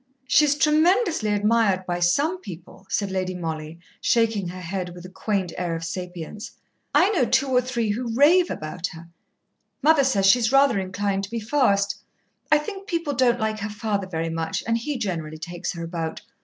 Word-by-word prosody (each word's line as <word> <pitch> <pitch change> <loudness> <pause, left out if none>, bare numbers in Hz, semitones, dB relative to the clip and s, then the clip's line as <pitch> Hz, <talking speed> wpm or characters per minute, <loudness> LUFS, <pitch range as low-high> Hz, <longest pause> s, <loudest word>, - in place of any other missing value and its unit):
"She's 290 +2 +4
tremendously 315 - +3
admired 205 -2 +2
by 175 -1 -2
some 285 - +2
people," 185 0 -11
said 200 -2 -1
Lady 185 -1 -2
Mollie, 160 -2 -5 0.2
shaking 225 -5 +2
her 180 +1 -7
head 180 0 -4
with 175 0 -10
a - - -8
quaint 190 -2 -2
air 175 -2 -1
of 165 - -5
sapience. 180 +3 -6 0.4
"I 385 +4 +4
know 360 -11 +2
two 265 +3 +2
or 250 -1 +3
three 240 -3 -2
who 235 +2 -3
rave 340 +7 +5
about 160 +3 -4
her. 165 +1 -12 0.7
Mother 310 -2 +5
says 205 -8 +2
she's 225 +3 +5
rather 275 -5 +4
inclined 195 +1 -2
to - - -15
be 230 +1 -3
fast. 205 -5 +1 0.5
I 300 - +7
think 390 +6 -6
people 335 -6 -1
don't 245 -2 +2
like 220 -1 -1
her 205 0 -3
father 205 -2 -2
very 165 -2 -3
much, 165 0 -2
and 230 - +1
he 260 +5 -2
generally 165 -8 -4
takes 175 +2 -5
her 170 -1 -6
about. 165 +1 -4
205 Hz, 185 wpm, -24 LUFS, 180-255 Hz, 0.7 s, I